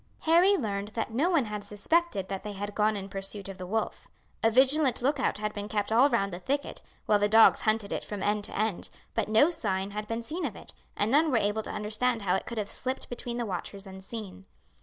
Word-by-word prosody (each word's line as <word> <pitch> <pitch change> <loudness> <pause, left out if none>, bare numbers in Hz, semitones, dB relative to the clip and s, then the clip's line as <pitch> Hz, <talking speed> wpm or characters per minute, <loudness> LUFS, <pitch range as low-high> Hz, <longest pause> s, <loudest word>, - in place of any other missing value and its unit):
Harry 350 +5 +5
learned 205 - -2
that 225 -1 -2
no 295 +10 +2
one 325 -9 +3
had 210 -1 -5
suspected 210 - 0
that 195 -1 -5
they 210 -1 -5
had 205 +1 -5
gone 215 0 +2
in 195 -1 -6
pursuit 195 +1 -6
of 195 -1 -8
the 180 - -6
wolf. 220 +3 -2 0.3
A 225 - +4
vigilant 265 +2 +3
look 280 +2 +2
out 250 - 0
had 210 0 -3
been 205 -1 -5
kept 210 0 -2
all 250 +6 +5
round 200 -7 0
the 175 - -5
thicket, 280 +9 -2 0.2
while 210 -1 +3
the 205 0 +2
dogs 225 +1 +6
hunted 215 -2 +1
it - - -3
from 205 -2 -5
end 210 0 +1
to - - -6
end, 215 -3 -1 0.2
but - - 0
no 255 +10 +5
signs 195 - -2
had 210 0 -4
been 230 +1 -3
seen 330 +8 -4
of 250 -9 -2
it, - - -12 0.2
and 205 +2 +1
none 310 +4 +4
were 255 - +3
able 205 0 +1
to - - -9
understand 220 +2 -1
how 180 -2 +1
it 190 - -1
could 235 - -5
have 210 -2 -1
slipped 260 +5 -4
between 240 0 -5
the 240 - -1
watchers 195 +1 -5
unseen. 190 0 -9
215 Hz, 240 wpm, -28 LUFS, 200-250 Hz, 0.3 s, dogs